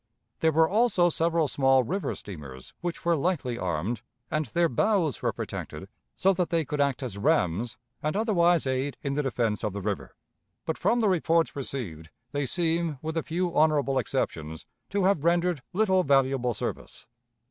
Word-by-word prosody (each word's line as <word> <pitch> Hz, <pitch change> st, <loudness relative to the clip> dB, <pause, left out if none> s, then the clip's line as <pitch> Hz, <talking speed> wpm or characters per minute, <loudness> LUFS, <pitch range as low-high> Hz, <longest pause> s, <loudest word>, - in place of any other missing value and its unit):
There 160 Hz, -, +3 dB
were 160 Hz, +1 st, +4 dB
also 200 Hz, -3 st, +3 dB
several 165 Hz, -1 st, +1 dB
small 135 Hz, -2 st, +3 dB
river 190 Hz, -, -2 dB
steamers 70 Hz, -9 st, -9 dB
which 175 Hz, -1 st, -4 dB
were 170 Hz, -1 st, +4 dB
lightly 140 Hz, -7 st, -1 dB
armed, 95 Hz, +6 st, -2 dB, 0.3 s
and 155 Hz, -2 st, 0 dB
their 170 Hz, +9 st, +2 dB
bows 165 Hz, -, +1 dB
were -, -, +1 dB
protected -, -, -6 dB, 0.3 s
so 195 Hz, +1 st, +3 dB
that 180 Hz, -1 st, -1 dB
they 165 Hz, -3 st, +1 dB
could 145 Hz, +2 st, -1 dB
act 140 Hz, -2 st, 0 dB
as 100 Hz, -6 st, -5 dB
rams 100 Hz, +4 st, +1 dB, 0.2 s
and 155 Hz, +4 st, -1 dB
otherwise 175 Hz, -7 st, +3 dB
aid 130 Hz, +1 st, -1 dB
in 140 Hz, -2 st, -1 dB
the 150 Hz, -, +1 dB
defense 115 Hz, -6 st, -1 dB
of 105 Hz, -3 st, -1 dB
the 100 Hz, -, -4 dB
river; 105 Hz, -2 st, -3 dB, 0.5 s
but, -, -, -2 dB
from 240 Hz, 0 st, +2 dB
the 220 Hz, -, +3 dB
reports 165 Hz, -3 st, +2 dB
received, 105 Hz, -, -5 dB, 0.2 s
they 145 Hz, -1 st, -1 dB
seem, 165 Hz, 0 st, 0 dB
with 160 Hz, +1 st, -3 dB
a 165 Hz, -, +1 dB
few 175 Hz, +2 st, -2 dB
honorable 145 Hz, -3 st, +3 dB
exceptions, 80 Hz, -8 st, -3 dB, 0.2 s
to 200 Hz, -1 st, 0 dB
have 185 Hz, -6 st, +2 dB
rendered 175 Hz, -2 st, +2 dB
little 190 Hz, -1 st, +3 dB
valuable 135 Hz, -5 st, +2 dB
service. -, -, -5 dB
150 Hz, 170 wpm, -27 LUFS, 120-175 Hz, 0.5 s, were